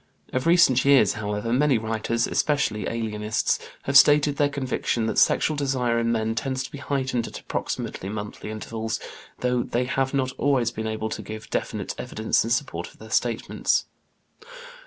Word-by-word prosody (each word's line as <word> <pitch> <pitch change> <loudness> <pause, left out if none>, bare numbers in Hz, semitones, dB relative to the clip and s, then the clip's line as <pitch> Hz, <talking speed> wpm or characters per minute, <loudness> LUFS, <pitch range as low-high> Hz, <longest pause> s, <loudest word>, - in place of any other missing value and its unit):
Of 130 +4 0
recent 165 -7 +5
years, 135 -8 +5
however, 105 +1 -2
many 140 0 +3
writers, 115 +1 -1
especially 140 -8 0
alienists, 110 -1 -1 0.2
have 140 - -2
stated 145 +1 +6
their 145 -1 +3
conviction 130 -4 -1
that 110 - +1
sexual 155 - +3
desire 130 -4 0
in 115 0 +1
men 110 -1 0
tends 130 +3 -2
to - - -8
be 140 - -8
heightened 130 -4 -1
at - - -8
approximately 95 - -4
monthly 105 0 -6
intervals, 110 +1 -4 0.4
though 125 -1 +1
they 120 +1 -1
have 135 +1 0
not 130 -2 0
always 130 -5 +2
been 110 0 -4
able 110 0 -3
to - - -4
give 110 0 -8
definite - - -2
evidence 110 0 0
in 115 - -4
support 125 +4 -1
of - - -17
their - - -12
statements. - - +1
120 Hz, 165 wpm, -25 LUFS, 110-135 Hz, 0.4 s, stated